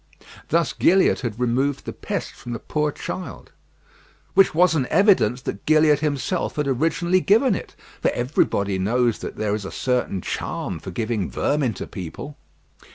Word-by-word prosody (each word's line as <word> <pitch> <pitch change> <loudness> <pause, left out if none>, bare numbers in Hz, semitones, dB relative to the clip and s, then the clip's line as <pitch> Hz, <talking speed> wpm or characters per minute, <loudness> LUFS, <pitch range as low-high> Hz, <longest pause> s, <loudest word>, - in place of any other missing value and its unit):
Thus 165 0 +1
Gilliatt 190 +2 +3
had 120 -3 -4
removed 130 +3 0
the - - -5
pest - - -4
from 120 - -8
the 115 - -4
poor 150 -1 -1
child, 185 +5 -7 0.8
which 195 -4 +4
was 180 +1 +5
an 140 -6 0
evidence 190 - +3
that 100 - -5
Gilliatt 155 -1 +5
himself 150 +4 -1
had 150 -2 -1
originally 165 +7 +1
given 230 +8 +4
it; - - -6 0.3
for - - +3
everybody 100 -6 0
knows 115 +4 +1
that - - -6
there 105 -1 -1
is 105 -1 -2
a 95 - -5
certain 125 -7 -1
charm - - -4
for - - -8
giving 110 -4 -2
vermin 140 -7 0
to - - -5
people. 95 - -8
135 Hz, 160 wpm, -23 LUFS, 115-160 Hz, 0.8 s, was